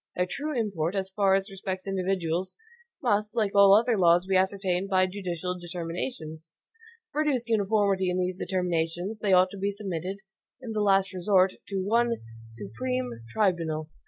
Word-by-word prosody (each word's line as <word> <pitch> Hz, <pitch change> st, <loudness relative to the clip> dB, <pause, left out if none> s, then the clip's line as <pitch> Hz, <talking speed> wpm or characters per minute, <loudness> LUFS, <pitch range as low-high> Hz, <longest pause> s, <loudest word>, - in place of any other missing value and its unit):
Their 180 Hz, -, +1 dB
true 290 Hz, +5 st, -3 dB
import, 190 Hz, -5 st, -1 dB
as 190 Hz, -1 st, -2 dB
far 195 Hz, -2 st, +4 dB
as 195 Hz, +1 st, -2 dB
respects 190 Hz, -1 st, -5 dB
individuals, 185 Hz, -2 st, -1 dB, 0.5 s
must, 210 Hz, -1 st, +1 dB
like 215 Hz, -4 st, +1 dB
all 200 Hz, 0 st, +7 dB
other 230 Hz, 0 st, +3 dB
laws, 175 Hz, 0 st, +5 dB
be 190 Hz, 0 st, 0 dB
ascertained 190 Hz, 0 st, +1 dB
by 185 Hz, -1 st, +4 dB
judicial 180 Hz, -2 st, -4 dB
determinations. 165 Hz, -1 st, -5 dB
To -, -, -34 dB, 0.6 s
produce 285 Hz, -5 st, 0 dB
uniformity 200 Hz, -3 st, +2 dB
in 180 Hz, -, -1 dB
these 185 Hz, 0 st, -2 dB
determinations, 180 Hz, +2 st, -2 dB
they 205 Hz, -2 st, 0 dB
ought 185 Hz, 0 st, +5 dB
to 200 Hz, -, -8 dB
be 200 Hz, +1 st, 0 dB
submitted, 195 Hz, -1 st, -5 dB, 0.4 s
in 250 Hz, -3 st, -7 dB
the 215 Hz, -1 st, -1 dB
last 195 Hz, -1 st, +3 dB
resort, 185 Hz, 0 st, +3 dB
to 195 Hz, -2 st, -2 dB
one 235 Hz, +3 st, +2 dB, 0.4 s
SUPREME 120 Hz, +4 st, -4 dB, 0.2 s
TRIBUNAL. 160 Hz, -, 0 dB
190 Hz, 160 wpm, -27 LUFS, 175-205 Hz, 0.6 s, all